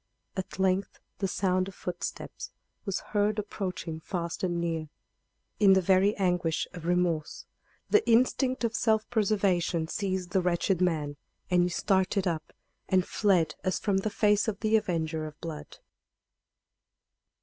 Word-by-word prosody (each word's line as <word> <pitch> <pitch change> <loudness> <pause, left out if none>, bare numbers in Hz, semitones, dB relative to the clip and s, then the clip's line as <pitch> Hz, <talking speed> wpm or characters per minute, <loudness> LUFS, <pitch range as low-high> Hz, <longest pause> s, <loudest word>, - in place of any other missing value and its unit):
At 190 -2 -5
length 190 0 0 0.2
the 195 - 0
sound 185 0 +1
of 195 - -9
footsteps 180 -1 -5 0.4
was 195 -3 -2
heard 205 0 +2
approaching 185 -5 -4
fast 170 0 -4
and 175 -2 0
near. 165 -2 -2 0.7
In 200 -2 +7
the 190 - +5
very 190 +3 +3
anguish 180 -4 0
of 170 -2 -7
remorse 175 -3 0 0.4
the 425 +1 +4
instinct 255 +2 +3
of 230 -1 0
self 220 -2 +2
preservation 190 -6 +1
seized 190 -1 -2
the 190 - +2
wretched 180 +1 +1
man, 155 -5 0 0.3
and 180 0 +5
he 175 - +2
started 190 +1 +1
up 165 -4 -2 0.4
and 185 -1 +3
fled 190 -6 +2
as 185 -2 0
from 200 -3 0
the 195 +3 0
face 210 0 +2
of 210 -2 -3
the 220 0 +3
avenger 160 -6 0
of 155 0 -12
blood. 150 -4 -7
185 Hz, 145 wpm, -29 LUFS, 170-205 Hz, 0.7 s, In